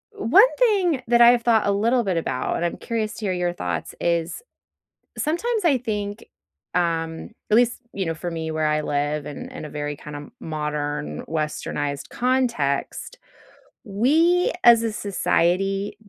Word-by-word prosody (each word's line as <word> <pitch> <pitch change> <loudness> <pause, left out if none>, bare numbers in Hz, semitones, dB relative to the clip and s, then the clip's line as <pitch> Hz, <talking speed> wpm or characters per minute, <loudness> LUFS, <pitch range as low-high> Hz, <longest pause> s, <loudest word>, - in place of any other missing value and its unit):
one 265 - +6 0.2
thing 385 - +2
that 240 0 +4
I 235 - +9
have 245 -1 +2
thought 230 -2 +3
a 200 - +2
little 230 +5 +2
bit 190 -5 -1
about, 130 -5 -2
and - - -3
I'm 170 - -2
curious 225 -2 -3
to 215 - -6
hear 190 - 0
your 175 -1 -1
thoughts, 90 - -4
is 170 - -1 0.8
sometimes 425 +8 -1
I 305 -6 +4
think, 210 -3 -4 0.5
um, 165 -1 -1 0.2
at 210 - +5
least, 240 0 +2
you 190 -2 -3
know, 165 - -1
for 175 +2 -5
me 160 -1 -4
where 155 0 0
I 150 0 +1
live 145 0 -1
in 145 - -7
in - - -8
a - - -10
very 145 0 -4
kind 150 +1 -9
of 145 0 -9
modern, 150 -1 -3
westernized 150 -2 -3
context, 245 - -1 0.7
we, 315 - +2
as 235 -1 +7
a 225 - -1
society, 195 -1 0
195 Hz, 165 wpm, -23 LUFS, 155-235 Hz, 0.8 s, I